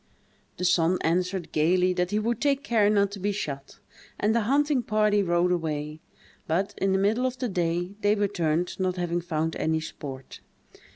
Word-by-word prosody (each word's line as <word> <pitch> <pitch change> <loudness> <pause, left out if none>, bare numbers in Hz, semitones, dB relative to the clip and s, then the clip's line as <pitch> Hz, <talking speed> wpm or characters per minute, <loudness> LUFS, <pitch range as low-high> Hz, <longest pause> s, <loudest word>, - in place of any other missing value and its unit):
The 180 - -2
son 175 0 +3
answered, 180 +2 -1
gayly, 180 +4 +2
that 180 0 0
he 210 - 0
would 230 +1 -1
take 280 -1 +1
care 215 -3 +3
not 200 -1 +2
to 200 - -7
be 205 +2 0
shot, 140 -9 -5 0.4
and 215 +1 +2
the 235 - +2
hunting 290 -1 +2
party 210 -2 +2
rode 175 -1 +2
away; 155 -2 -2 0.5
but, 190 +6 0
in 195 - +1
the 190 - +3
middle 220 +6 +2
of 255 0 -5
the 250 - -2
day, 175 -1 -1
they 205 +1 +3
returned, 180 -5 -1
not 185 -1 0
having 175 -1 -1
found 160 -1 -2
any 160 0 0
sport. 135 -4 -8
185 Hz, 180 wpm, -26 LUFS, 165-210 Hz, 0.5 s, son